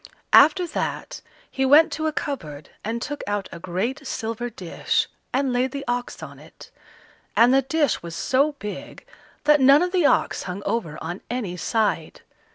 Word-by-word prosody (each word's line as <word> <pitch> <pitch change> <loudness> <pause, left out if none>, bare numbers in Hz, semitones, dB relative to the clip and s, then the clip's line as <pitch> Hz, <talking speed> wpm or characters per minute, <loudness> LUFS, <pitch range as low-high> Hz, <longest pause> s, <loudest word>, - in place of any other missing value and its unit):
After 355 +5 +7
that, 335 - -4 0.3
he 265 - -1
went 290 +5 +6
to 315 0 -2
a - - 0
cupboard 155 - -5
and 225 +2 -2
took 290 0 -5
out 205 -1 -2
a 170 - -8
great 205 - -3
silver 230 0 -3
dish, 185 -7 -1 0.2
and 265 0 0
laid 250 +1 0
the 280 0 -5
ox 245 0 -3
on - - -10
it; - - -15 0.7
and 240 +3 +6
the 270 - +5
dish 290 +3 0
was 170 -1 -7
so 275 - +1
big 210 - -8 0.4
that 300 -1 +5
none 275 +5 +7
of 360 - -1
the 360 -6 +3
ox - - +1
hung 190 +3 -5
over 200 -8 -2
on 175 +4 -5
any 225 -7 -3
side. 220 +4 -1
250 Hz, 170 wpm, -23 LUFS, 205-285 Hz, 0.7 s, After